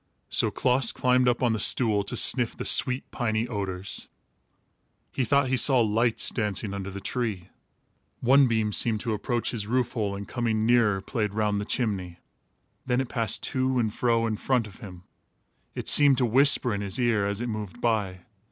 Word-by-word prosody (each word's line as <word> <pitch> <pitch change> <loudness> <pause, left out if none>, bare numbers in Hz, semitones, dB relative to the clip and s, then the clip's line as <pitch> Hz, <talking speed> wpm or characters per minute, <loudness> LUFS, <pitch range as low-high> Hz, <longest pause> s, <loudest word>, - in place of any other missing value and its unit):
So - - +1
Klaas 125 -1 +2
climbed 125 0 +1
up 120 +2 -1
on 120 -2 +2
the 110 - -2
stool 105 -1 +3
to - - -3
sniff 120 -3 +1
the - - -5
sweet 125 +1 0
piny 115 -1 -1
odors. 100 -4 -5 1.0
He 130 - -1
thought 140 +1 +1
he 130 - +1
saw 130 0 +3
lights 115 +1 +1
dancing 105 -2 -2
under 100 -1 -5
the 100 0 -7
tree. 105 -6 -4 0.7
One 135 +2 +4
beam 110 -3 -1
seemed 110 0 +1
to 115 - -2
approach 115 +2 -2
his 105 -4 -4
roof 125 +1 0
hole, 105 -4 -3
and 100 0 -7
coming 115 -3 -1
nearer 115 -5 +2
played 105 -2 -3
round 105 -2 0
the - - -5
chimney. 95 -8 -3 0.7
Then 125 -1 0
it 130 -2 -3
passed 115 -2 -1
to 130 0 0
and 110 -3 0
fro 115 -1 +1
in 110 -2 -2
front 125 -1 0
of 105 -1 -14
him. 90 -6 -11 0.7
It - - -6
seemed 145 -3 +6
to 125 - +2
whisper 125 0 +4
in 100 - -3
his 100 -2 -2
ear, 115 -5 +1
as 100 0 -3
it 120 - -3
moved 110 -1 -6
by. 105 -6 -1
115 Hz, 190 wpm, -26 LUFS, 105-125 Hz, 1.0 s, seemed